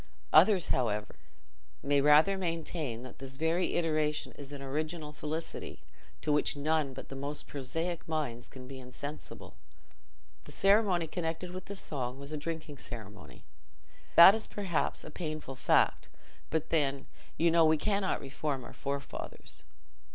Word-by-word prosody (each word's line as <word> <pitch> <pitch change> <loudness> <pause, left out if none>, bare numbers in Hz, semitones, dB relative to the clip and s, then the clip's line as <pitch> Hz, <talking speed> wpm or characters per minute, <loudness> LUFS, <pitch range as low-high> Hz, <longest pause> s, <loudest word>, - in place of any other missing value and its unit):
Others, 195 -5 +6
however, 105 -4 0 0.7
may 140 0 +3
rather 150 +7 +6
maintain 165 -8 -3
that 130 - -11
this 135 0 -8
very 165 +4 +1
iteration 155 -2 0
is 140 -1 -10
an 145 - -6
original 150 +3 -3
felicity, 155 +2 -5 0.4
to 150 - 0
which 150 0 +3
none 150 -1 +1
but - - -8
the 135 - -7
most 140 +2 -4
prosaic 165 +5 -3
minds 145 -7 -3
can 130 -1 -11
be 135 0 -8
insensible. 135 +4 -8 0.9
The - - -11
ceremony 195 -4 +4
connected 165 +2 -3
with 185 +1 -7
the 200 - -6
song 130 -8 -3
was 140 +1 -8
a 155 - -3
drinking 155 -1 -5
ceremony. 105 -4 -9 0.7
(That 170 +3 +11
is 220 0 -1
perhaps 190 -6 -1
a 155 - -9
painful 155 -5 -5
fact, 130 - +2 0.4
but 160 0 -1
then, 140 -4 +1 0.3
you 170 +1 +4
know, 165 0 +5
we 155 0 +5
cannot 200 +3 0
reform 140 -1 -3
our - - -10
forefathers.) 140 0 -6
150 Hz, 145 wpm, -31 LUFS, 135-165 Hz, 0.9 s, That